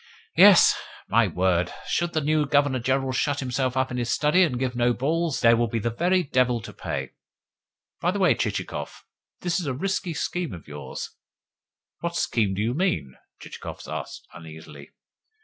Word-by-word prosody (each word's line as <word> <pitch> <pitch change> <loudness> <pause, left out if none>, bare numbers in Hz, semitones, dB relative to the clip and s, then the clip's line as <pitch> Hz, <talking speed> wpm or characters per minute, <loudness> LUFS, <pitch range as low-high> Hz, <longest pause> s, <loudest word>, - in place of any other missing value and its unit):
Yes, - - +8 0.4
my 115 +1 +4
word! 90 -1 +1 0.2
Should 175 0 -1
the 155 - +1
new 150 0 +1
Governor 140 -2 +2
General 130 +2 0
shut 145 +2 0
himself 130 0 -1
up 130 0 0
in 125 - -3
his 120 -1 -2
study, 150 +5 +3
and 155 -9 +2
give 125 -1 -2
no 120 0 +2
balls, 160 +4 -1
there 115 -1 +6
will 120 0 +1
be 115 - -2
the 115 +2 -1
very 180 +9 +1
devil 125 -4 +1
to - - -10
pay! - - -5 0.9
By - - +1
the - - -1
way, - - +4
Chichikov, - - -4 0.4
that - - -15
is 170 - -4
a 130 - -2
risky 185 +2 -2
scheme 175 - -3
of 85 - -10
yours." 75 -3 -7 0.9
"What 170 0 -3
scheme 105 - 0
to 100 - -2
you 115 +3 0
mean?" 90 - -1 0.3
Chichikov - - -9
asked - - -6
uneasily. 80 -1 -11
130 Hz, 175 wpm, -25 LUFS, 115-155 Hz, 0.9 s, Yes